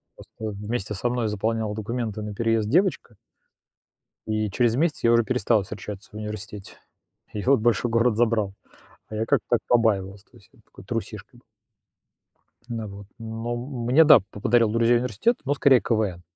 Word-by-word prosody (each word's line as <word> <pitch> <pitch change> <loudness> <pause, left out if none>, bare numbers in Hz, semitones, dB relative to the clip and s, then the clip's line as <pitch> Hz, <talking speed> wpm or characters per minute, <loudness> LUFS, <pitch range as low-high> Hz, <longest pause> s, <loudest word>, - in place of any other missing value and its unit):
Просто 105 -2 -8
вместе 105 0 -4
со 120 +5 -1
мной 120 -2 -1
заполняла 110 +1 -2
документы 110 0 -4
на 105 0 -5
переезд 115 0 0
девочка 155 - +1 1.1
и 110 -1 -1
через 120 +1 +2
месяц 155 +3 0
я 115 - +4
уже 115 0 +4
перестал 120 -3 +1
встречаться 100 +1 -8
в - - -15
университете. 105 -2 -7 0.6
Её 125 +7 +2
большой 115 +1 +1
город 115 -1 +2
забрал. 110 -4 +1 0.6
А 110 - -7
я 110 - -1
как-то - - +1
так 120 - +3
побаивался, 100 -4 +1
то - - -18
есть, - - -22
вот, - - -24
такой - - -15
трусишкой - - -6
был. - - -31 1.2
На 115 -3 -4
вот, 100 0 -11
но 115 +1 -4
мне, 125 +3 +2
да, 155 -6 +8
по - - -9
подарил 115 0 +3
друзей 115 +2 +3
университет, 125 - 0
но 145 - +1
скорее 135 -4 +4
КВН. 105 -6 -1
115 Hz, 165 wpm, -24 LUFS, 105-120 Hz, 1.2 s, да